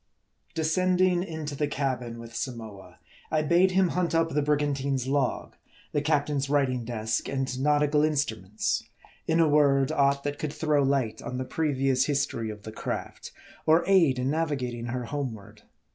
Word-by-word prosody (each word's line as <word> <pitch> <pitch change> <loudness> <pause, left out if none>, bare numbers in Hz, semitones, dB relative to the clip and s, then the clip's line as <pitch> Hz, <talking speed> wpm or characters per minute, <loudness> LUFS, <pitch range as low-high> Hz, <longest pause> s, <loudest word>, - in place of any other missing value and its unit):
DESCENDING 180 +2 +2
into 160 -5 -5
the 150 +1 0
cabin 130 -5 -2
with 115 0 -10
Samoa, 110 -7 -6 0.3
I 155 -1 +1
bade 175 +5 +4
him 185 -1 +3
hunt 175 -1 0
up 165 0 +2
the 150 -1 0
brigantine's 140 -3 0
log, 135 -2 -1 0.4
the 145 - 0
captain's 145 -2 0
writing 135 -4 +1
desk, 110 -1 -2
and 135 -1 -1
naut 150 +1 +3
ical 150 +1 +2
instruments; 110 -10 -1 0.5
in 160 +1 +2
a 165 - +5
word, 140 -3 +3
aught 140 0 +2
that 145 0 -3
could 150 -1 -3
throw 150 -3 +1
light 135 -5 0
on 125 +2 -5
the 130 - -3
previous 135 -4 +1
history 140 -6 -1
of 105 -1 -8
the 110 - -7
craft, - - -5 0.4
or 160 +2 +5
aid 170 -9 +4
in 130 +2 0
navigating 135 -7 -2
her 125 0 -3
homeward. 125 -7 -6
140 Hz, 160 wpm, -27 LUFS, 125-155 Hz, 0.5 s, a